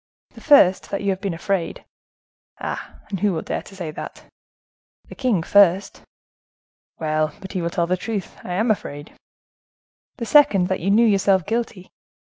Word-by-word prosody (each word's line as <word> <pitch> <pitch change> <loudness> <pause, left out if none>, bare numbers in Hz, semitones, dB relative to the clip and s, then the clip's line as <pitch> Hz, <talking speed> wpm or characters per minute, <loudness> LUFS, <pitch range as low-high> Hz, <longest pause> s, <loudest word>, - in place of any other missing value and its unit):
"The - - -15
first, 235 - +5
that 200 - -3
you 200 - +1
have 190 0 -4
been 195 -4 -3
afraid." 180 0 -3 0.7
"Ah! - - -6
and 195 - -3
who 205 0 +1
will 160 - -3
dare - - -3
to 195 - -15
say 175 -5 -5
that?" - - -9 0.9
"The - - -9
king 240 -11 0
first." 195 +1 +3 1.0
"Well! 155 -1 -1
but 190 -1 -9
he 185 - -3
will 170 - -1
tell 170 0 0
the 180 +2 0
truth,—I 195 -3 -5
am 220 +5 +1
afraid." 145 -7 -5 1.0
"The 235 - -4
second, 210 -10 +4
that 190 - -1
you 190 - -2
knew 220 +4 +5
yourself 195 -4 +3
guilty." 220 -4 -4
190 Hz, 165 wpm, -22 LUFS, 175-205 Hz, 1.0 s, first